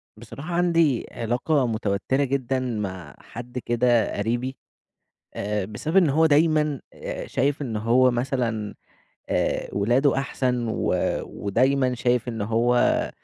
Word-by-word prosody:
بصراحة 140 +10 -8
عندي 165 -7 +2
علاقة 125 +4 0
متوترة 110 +4 0
جدًا 135 -1 -1
مع 95 - -4
حد 120 +2 -9
كده 120 -2 +1
قريبي، 120 +5 -2 0.8
آآ 105 -1 -2
بسبب 110 - -4
إن 175 -6 +5
هو 160 +4 +4
دايمًا 150 -2 +2
آآ - - -6
شايف 140 +2 0
إن 115 -5 -3
هو 120 +4 +4
مثلًا، 120 -4 -2 0.5
آآ - - 0
ولاده 120 +7 +2
أحسن 125 -3 -1
و 110 - 0 0.3
ودايمًا 130 +5 +1
شايف 125 0 0
إن 115 -3 -3
هو 115 +3 +2
125 Hz, 120 wpm, -24 LUFS, 115-140 Hz, 0.8 s, إن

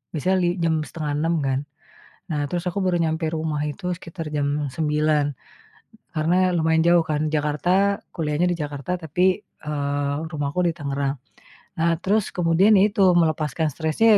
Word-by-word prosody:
biasanya 185 +5 +1
li - - +3 0.2
jam 165 -1 +2
05:30 155 +1 -1
kan. 135 0 +1 0.7
Nah, 150 - -1
terus 175 +3 -3
aku 195 +3 -2
baru 180 -1 +2
nyampe 160 0 -1
rumah 155 -2 -2
itu 180 +5 -4
sekitar 165 -3 -7
jam 145 -1 -1
09.00 150 0 +1 0.9
karena 155 +3 +2 0.2
lumayan 160 0 +2
jauh 170 -1 +5
kan 150 -1 -1
Jakarta, 175 +7 +1 0.2
kuliahnya 155 +1 0
di 175 - 0
Jakarta, 145 0 -5
tapi, 160 +4 -1 0.2
eee, 145 -1 -3 0.2
rumahku 145 +2 -2
di 170 - +2
Tangerang. 140 -1 -2 0.6
Nah, 170 +1 +3
terus 205 +1 +1
kemudian 180 +4 +4
ya 195 - +6
itu, 200 -2 +1 0.2
melepaskan 155 -1 +1
stresnya 170 +8 +3
160 Hz, 150 wpm, -23 LUFS, 150-175 Hz, 0.9 s, ya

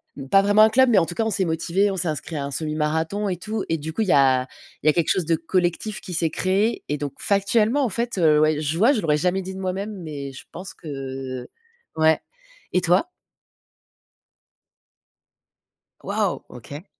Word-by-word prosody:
Mmh, 135 -1 -8
pas 195 +5 +6
vraiment 205 +1 +4
un 220 - +7
club 260 +2 +4
mais 220 - +4
en 165 - +1
tout 175 - -4
cas 225 - 0
on - - 0
s'est 190 -1 +2
motivés, 170 +5 +1
on 190 - -4
s'est 175 -1 0
inscrit 155 +1 -4
à 140 - -2
un 140 - -6
semi 155 +2 -2
marathon 160 +7 -1
et 180 - -2
tout 215 +4 -4
et 165 - +1
du 160 +2 -6
coup 225 - -2
il 215 - 0
y - - +4
a 130 -2 +4 0.4
il - - -1
y - - +8
a - - +4
quelque 170 -1 0
chose 185 - +2
de 165 0 +2
collectif 175 +5 -1
qui 180 - -8
s'est 165 -1 +1
créé, 200 +7 0
et 150 - -1
donc 145 -1 -5
factuellement 215 +6 +2
en 250 - +1
fait, 230 +1 -2
heu, 155 -3 +4
ouais. 155 0 +2
Je 155 +2 -1
vois 230 +8 +5
je 225 - -1
l'aurais 150 -4 +2
jamais 180 +4 0
dit 190 +1 -7
de 190 - -7
moi-même 195 +3 -3
mais 140 -3 -6
je 135 - -11
pense 185 +3 -7
que, 135 -4 -6 0.5
ouais, 160 0 +3 0.5
et 180 - +3
toi? 180 - +2 2.9
Waouh, 205 -2 -1
OK. 145 - -10
175 Hz, 215 wpm, -23 LUFS, 150-200 Hz, 2.9 s, y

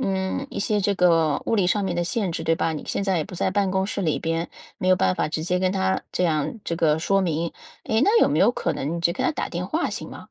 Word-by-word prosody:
嗯， 190 +6 -1
一 - - -6
些 210 +1 +1
这 200 +1 +1
个 165 -5 +3
物 - - 0
理 200 -5 +2
上 200 +2 +1
面 180 - -1
的 175 - 0
限 195 0 -1
制， - - -4
对 165 0 +2
吧？ 165 - -1
你 155 - -5
现 200 - -2
在 190 -3 +1
也 155 - -1
不 180 - -10
在 - - 0
办 200 -2 +1
公 190 0 0
室 200 - -3
里 160 -5 0
边， 165 +1 -2 0.3
没 185 - -1
有 185 - +5
办 90 - +2
法 - - -1
直 155 0 -3
接 180 +1 0
跟 185 0 +1
他 190 0 0
这 180 - 0
样 155 +5 0
这 170 - -2
个 155 -2 +2
说 195 +4 +2
明， 170 -2 -1 0.3
诶， 220 0 +1
那 440 +4 +5
有 - - +5
没 150 - +1
有 205 - +5
可 - - -2
能 155 +5 -3
你 - - -4
只 170 - +3
给 - - -3
他 345 - +2
打 - - -4
电 175 +1 -3
话 320 - -1
行 - - -5
吗？ - - -9
180 Hz, 320 characters per minute, -24 LUFS, 165-195 Hz, 0.3 s, 有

